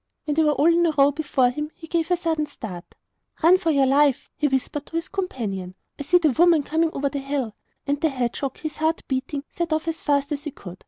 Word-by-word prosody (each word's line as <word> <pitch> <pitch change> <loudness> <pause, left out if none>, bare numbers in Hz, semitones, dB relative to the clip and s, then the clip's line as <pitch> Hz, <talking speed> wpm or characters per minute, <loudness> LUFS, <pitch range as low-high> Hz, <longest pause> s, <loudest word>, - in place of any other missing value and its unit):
When 300 - 0
they 320 - +2
were 300 -1 +3
all 285 +1 +1
in 345 0 +3
a - - +2
row 280 +1 +6
before 285 -4 +1
him 300 +4 -4
he 325 - -11
gave 330 0 -1
a 355 - +3
sudden 325 -3 -1
start. 195 -11 -9 0.5
'Run 360 +3 +6
for 350 -4 0
your 280 -3 +4
life,' 275 0 +2
he 300 - +1
whispered 275 +2 -2
to - - -10
his 330 - -1
companion; 210 - -4 0.2
'I - - -4
see 355 +6 +4
the 320 -4 +3
woman 330 +2 +4
coming 320 +3 +1
over 280 +1 -1
the 280 - -4
hill!' 275 -5 -3 0.3
And 285 0 -1
the 320 - +3
hedgehog, 260 0 -3
his 310 -2 -6
heart 320 +1 0
beating, 270 +2 -2
set 340 -1 -3
off 315 +1 0
as 330 0 -2
fast 285 0 +1
as 290 +1 -3
he - - -2
could. 185 -9 -11
295 Hz, 245 wpm, -23 LUFS, 270-325 Hz, 0.5 s, row